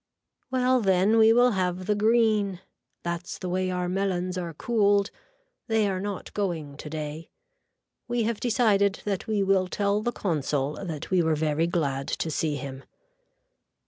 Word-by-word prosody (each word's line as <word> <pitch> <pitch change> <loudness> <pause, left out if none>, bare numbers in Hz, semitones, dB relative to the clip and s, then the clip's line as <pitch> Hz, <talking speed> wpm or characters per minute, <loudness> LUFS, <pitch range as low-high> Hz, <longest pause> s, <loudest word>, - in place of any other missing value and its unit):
Well 255 0 +2
then 195 +2 +3
we 220 0 +7
will 245 +2 +5
have 185 -2 -1
the 210 - +2
green. 215 -3 +2 0.4
That's 170 0 -4
the 185 - -5
way 185 +1 0
our 180 -1 -1
melons 185 -1 -1
are 170 -3 -4
cooled. 205 -1 +2 0.6
They 220 -3 +2
are 190 -1 -1
not 200 0 -5
going 165 -8 -3
today. 155 +1 -6 0.8
We 240 -1 0
have 225 -1 -1
decided 210 -4 +2
that 200 -3 -2
we 210 -2 +1
will 190 -1 +2
tell 200 +2 0
the 240 - -1
consul 150 - -2
that 160 -4 -6
we 185 -1 +4
were 160 -1 +2
very 155 +1 +1
glad 140 -6 -1
to 160 - -2
see 155 0 -1
him. 135 0 -7
185 Hz, 155 wpm, -26 LUFS, 165-210 Hz, 0.8 s, we